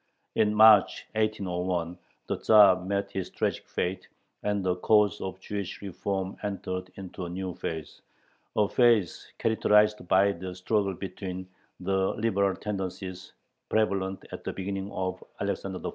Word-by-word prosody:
In 105 0 +2
March, 110 -2 +6
1801, 90 -5 -1 0.3
the - - -2
Tzar 100 -4 +6
met 100 +1 -2
his 95 -1 -3
tragic - - -2
fate, 90 +2 -2 0.3
and 105 -2 -1
the 90 -1 0
cause 105 +2 +3
of 95 0 -5
"Jewish 100 -1 -5
reform" 95 0 -3
entered 95 -3 -4
into 95 -1 -7
a - - -5
new 90 +1 -4
phase, 80 -3 -6 0.5
a 105 -1 +3
phase 115 -4 +2
characterized 105 -3 +3
by 95 +3 +4
the 90 0 -6
struggle 100 +1 0
between 95 -1 -6 0.3
the 95 +1 0
liberal 100 -3 +1
tendencies 95 -2 -5 0.4
prevalent 100 -3 0
at - - -7
the - - -3
beginning 95 +1 -4
of 95 0 -3 0.2
Alexander 95 -1 -3
I.' - - 0
95 Hz, 140 wpm, -28 LUFS, 95-105 Hz, 0.5 s, March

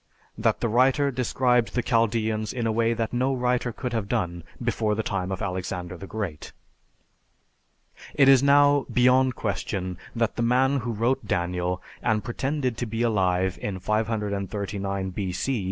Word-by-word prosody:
That - - 0
the - - +1
writer 130 +5 +3
described 125 -1 +1
the 125 - +1
Chaldeans 110 -2 0
in 120 -2 -2
a 115 - +1
way 115 +1 +1
that 115 0 -2
no 130 +2 +1
writer 125 -1 0
could 125 +1 -5
have 110 -3 -2
done 85 -8 -2 0.2
before 115 -3 0
the 110 - -1
time 95 -2 -2
of 95 +3 -3
Alexander 90 -1 -4
the 95 +2 -9
Great. 95 -9 -5 1.6
It 135 - +5
is 135 -2 +7
now 145 0 +4
beyond 125 0 +4
question 95 -3 -3 0.2
that 115 -1 0
the - - 0
man 130 +4 +3
who 120 -2 -3
wrote 115 +2 0
Daniel, 90 0 -1 0.2
and 110 -2 +1
pretended 130 0 -2
to 120 - -3
be 115 +2 -2
alive 95 -4 +1
in 100 -2 -3
539 100 -2 -2
B.C. 100 +7 -2
115 Hz, 155 wpm, -25 LUFS, 95-125 Hz, 1.6 s, is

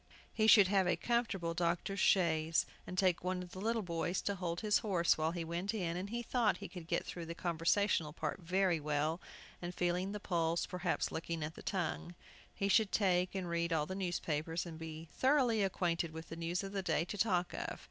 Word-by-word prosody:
He 220 -1 +2
should 205 -3 +8
have 190 -1 +3
a 180 - +3
comfortable 220 -8 0
doctor's 175 +3 -1
chaise, 165 -3 +3 0.2
and 185 - -6
take 185 -3 +2
one 180 0 -1
of 180 - -11
the 185 - -7
little 225 +1 0
boys 170 +1 -1
to 200 - 0
hold 175 -3 -3
his 210 -1 +3
horse 185 -7 +2
while 155 0 0
he 170 0 -3
went 175 +6 -2
in, 175 -5 -1
and 185 +3 -4
he 240 +2 -3
thought 240 -2 +2
he 200 - -7
could 175 -3 -9
get - - 0
through 170 -2 -6
the 170 - -5
conversational 170 -1 +1
part 165 - -3
very 180 -1 +1
well, 150 +3 -1 0.4
and 175 0 -5
feeling 180 +2 0
the 210 - -4
pulse, 170 -3 0
perhaps 180 -1 -1
looking 165 -1 -3
at 155 +1 -4
the - - -11
tongue. 175 -1 -3 0.4
He 200 - -2
should 205 0 +4
take 185 -2 +2
and 185 -2 -2
read 170 0 -1
all 155 -2 +2
the 185 - -5
newspapers, 170 -3 -2
and 165 -2 -7
so - - -13
be 160 0 -7
thoroughly 260 -5 +3
acquainted 170 -4 0
with 160 +1 -8
the 165 - -6
news 170 +3 -2
of 195 - -5
the 200 -1 -2
day 165 -2 +1
to 195 - -5
talk 180 -4 +1
of. - - -4
175 Hz, 220 wpm, -35 LUFS, 165-195 Hz, 0.4 s, should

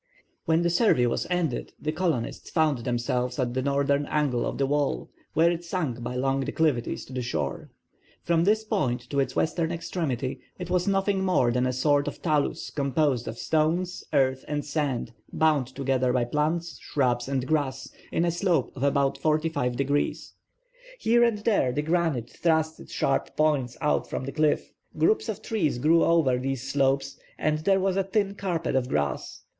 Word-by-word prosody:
When 165 +1 +2
the 170 - +2
survey 170 - +3
was 120 - -1
ended 175 -8 -1
the 155 - -2
colonists 160 -8 -2
found 155 -5 +2
themselves 125 +1 -1
at 125 -3 -1
the 130 - 0
northern 140 +1 +1
angle 145 -6 0
of - - -4
the 140 - +2
wall, 140 - -1 0.2
where 165 +2 +5
it 170 0 -3
sunk 155 -9 -3
by 120 +1 -4
long 135 +1 +1
declivities 140 -2 0
to 130 - -12
the 125 - -2
shore. 80 - -3 0.5
From 170 -1 +2
this 215 +4 +3
point 125 - 0
to 140 - +1
its 135 - 0
western 165 +1 0
extremity 140 -7 -3 0.2
it 180 -1 -6
was 180 +1 +1
nothing 195 0 +1
more 155 -10 +3
than 125 +1 +1
a - - +1
sort 145 +3 +2
of - - -5
talus 150 -4 0
composed 140 -3 0
of 115 - -5
stones, 165 +6 0
earth, 130 -3 +2
and 145 -1 -2
sand 145 -6 -2 0.2
bound 150 -5 +2
together 130 -1 0
by 125 -1 +1
plants, 155 +6 -1
shrubs, 125 -3 0
and 135 -2 -1
grass, 135 -3 -1 0.2
in 170 - +1
a 170 - +2
slope 175 0 0
of 130 - -8
about 140 0 +1
45°. 145 -3 0 0.7
Here 240 - +3
and 230 -3 +3
there 200 - +2
the 150 +4 -1
granite 160 -7 0
thrust 160 -1 0
its - - -12
sharp 135 - -1
points 145 -6 +1
out 150 - +1
from 130 - -3
the 135 - -4
cliff. 155 0 0 0.2
Groups 215 +8 +2
of 220 - -4
trees 170 - 0
grew 160 +6 +4
over 155 -7 +3
these 135 -1 -3
slopes 135 0 0 0.2
and 155 0 0
there 195 +4 +3
was 190 0 +1
a 195 - +2
thin 200 +1 0
carpet 175 -7 -2
of 130 -1 +1
grass. 70 -2 -2
145 Hz, 180 wpm, -26 LUFS, 130-170 Hz, 0.7 s, where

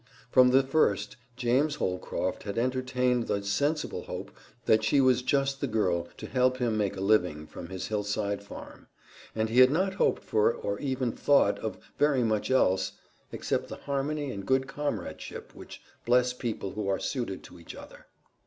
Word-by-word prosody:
From 125 -1 +6
the 135 +2 +5
first, 125 -6 +1 0.2
James 130 +5 +2
Holcroft 90 -8 -2
had 100 +1 -5
entertained 125 0 0
the 100 - -1
sensible 145 +10 -1
hope - - -6 0.3
that 110 0 +4
she 140 +6 +3
was 130 -2 +4
just 135 +1 0
the 140 - 0
girl 90 -7 0
to - - -7
help 130 0 +1
him 120 -3 0
make 100 -2 -1
a - - -4
living 90 -7 +2
from 85 - -9
his 95 -1 -5
hillside 105 -1 -1
farm, 100 - -11 0.5
and 110 0 0
he 120 +3 +3
had 130 0 +9
not 190 +6 +1
hoped 190 - +1
for 110 +1 +2
or 100 -3 -4
even 130 -3 -1
thought 140 -7 +3
of 110 - -4 0.2
very 145 -4 +3
much 110 -2 0
else 95 -7 +2 0.4
except - - -2
the - - -7
harmony 145 0 -2
and 100 -3 -7
good 130 0 +2
comradeship 135 -9 -5
which - - -11 0.2
bless 125 +1 +3
people 115 -6 -4
who 105 0 -4
are 95 -1 +1
suited 120 -8 -3
to 90 - -13
each 85 - -10
other. - - -13
120 Hz, 175 wpm, -28 LUFS, 100-130 Hz, 0.5 s, had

